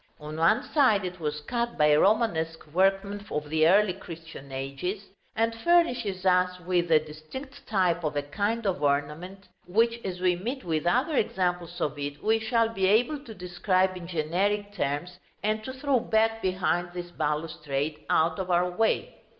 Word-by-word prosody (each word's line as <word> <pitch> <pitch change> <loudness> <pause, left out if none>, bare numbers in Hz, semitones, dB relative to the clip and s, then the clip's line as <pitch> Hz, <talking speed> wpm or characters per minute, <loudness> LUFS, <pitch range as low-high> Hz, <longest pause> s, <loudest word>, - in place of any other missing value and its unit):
On 150 0 -7
one 190 - +3
side 235 -10 +4
it 180 0 -6
was 150 -2 -3
cut 235 +8 -2
by 150 0 +5
Romanesque 165 -4 +1
workmen 195 +2 +1
of 150 0 -3
the 160 0 +4
early 200 +2 +4
Christian 165 -6 -10
ages, 140 +10 -4 0.3
and 225 +1 +1
furnishes 230 - +1
us 180 0 +3
with 175 -1 0
a 160 - +8
distinct 155 - -8
type 180 -4 +1
of 155 -1 -2
a 145 - 0
kind 205 +10 -2
of 190 -2 0
ornament 150 +7 -1 0.2
which, 230 +5 +1
as 180 -2 -4
we 180 -1 +2
meet 245 +9 -4
with 160 -1 -1
other 260 - +2
examples 180 -5 -1
of 150 -3 -2
it, 145 0 -5
we 220 +1 +3
shall 225 0 +1
be 195 -4 0
able 245 +9 +3
to 225 -6 -10
describe 185 +1 0
in 175 -2 -8
generic 190 +5 -1
terms, 175 +1 -3 0.2
and 215 +1 0
to 260 - -4
throw 265 0 +1
back 225 0 +1
behind 180 -1 0
this 175 -1 -6
balustrade, 150 -2 -2
out 160 +1 +2
of 185 -1 -3
our 180 0 +2
way. 220 +5 0
180 Hz, 170 wpm, -27 LUFS, 160-215 Hz, 0.3 s, a